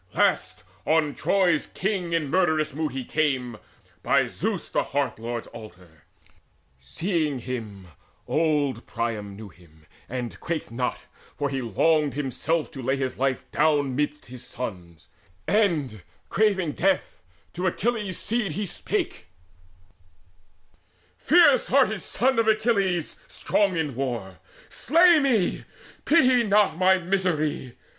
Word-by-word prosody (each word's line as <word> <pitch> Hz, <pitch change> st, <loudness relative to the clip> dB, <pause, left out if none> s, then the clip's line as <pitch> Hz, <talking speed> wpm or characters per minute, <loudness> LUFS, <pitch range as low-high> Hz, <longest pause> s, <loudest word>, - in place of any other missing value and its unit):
Last, -, -, +1 dB, 0.2 s
on 155 Hz, -2 st, +2 dB
Troy's 180 Hz, -6 st, +1 dB
king 190 Hz, -3 st, -2 dB
in 160 Hz, -4 st, -1 dB
murderous 155 Hz, -5 st, +2 dB
mood 155 Hz, 0 st, -2 dB
he 130 Hz, -1 st, -5 dB
came. 130 Hz, -7 st, -1 dB, 0.4 s
By -, -, +3 dB
Zeus -, -, -4 dB
the -, -, +2 dB
Hearth 140 Hz, -4 st, -2 dB
lord's 115 Hz, 0 st, -4 dB
altar. 90 Hz, -8 st, -14 dB, 0.7 s
Seeing 155 Hz, -, -2 dB
him, 110 Hz, -7 st, -6 dB, 0.4 s
Old 150 Hz, -4 st, 0 dB
Priam 110 Hz, -4 st, -3 dB
knew 105 Hz, 0 st, -10 dB
him 80 Hz, -3 st, -21 dB, 0.2 s
and 125 Hz, -2 st, -5 dB
quaked 170 Hz, -7 st, -4 dB
not; 125 Hz, +1 st, -2 dB, 0.4 s
for 145 Hz, -, -1 dB
he 135 Hz, -1 st, -2 dB
longed 150 Hz, +6 st, +1 dB
Himself 145 Hz, +3 st, -2 dB
to 135 Hz, -, -8 dB
lay 130 Hz, +2 st, 0 dB
his 130 Hz, -2 st, -3 dB
life 135 Hz, -1 st, 0 dB
down 145 Hz, -3 st, +2 dB
midst 150 Hz, +1 st, -2 dB
his 125 Hz, 0 st, -8 dB
sons; 90 Hz, -9 st, -7 dB, 0.4 s
And 160 Hz, -, +1 dB, 0.3 s
craving 195 Hz, -6 st, +1 dB
death 185 Hz, -, 0 dB, 0.3 s
to 180 Hz, +2 st, -2 dB
Achilles' 210 Hz, -1 st, -1 dB
seed 220 Hz, -7 st, -2 dB
he 205 Hz, +4 st, -2 dB
spake: 180 Hz, -, -3 dB, 1.9 s
"Fierce 290 Hz, -, +5 dB
hearted 245 Hz, -7 st, +2 dB
son 260 Hz, 0 st, +1 dB
of 225 Hz, -, +2 dB
Achilles 200 Hz, -6 st, +1 dB
strong 200 Hz, -4 st, 0 dB
in 155 Hz, -4 st, -1 dB
war, 115 Hz, -9 st, -4 dB, 0.3 s
Slay 335 Hz, +3 st, +4 dB
me, 245 Hz, -10 st, +2 dB
and -, -, -15 dB, 0.4 s
pity 260 Hz, -6 st, +5 dB
not 205 Hz, -6 st, +3 dB
my 190 Hz, +2 st, +4 dB
misery. 170 Hz, -8 st, -1 dB
155 Hz, 125 wpm, -25 LUFS, 125-190 Hz, 1.9 s, Fierce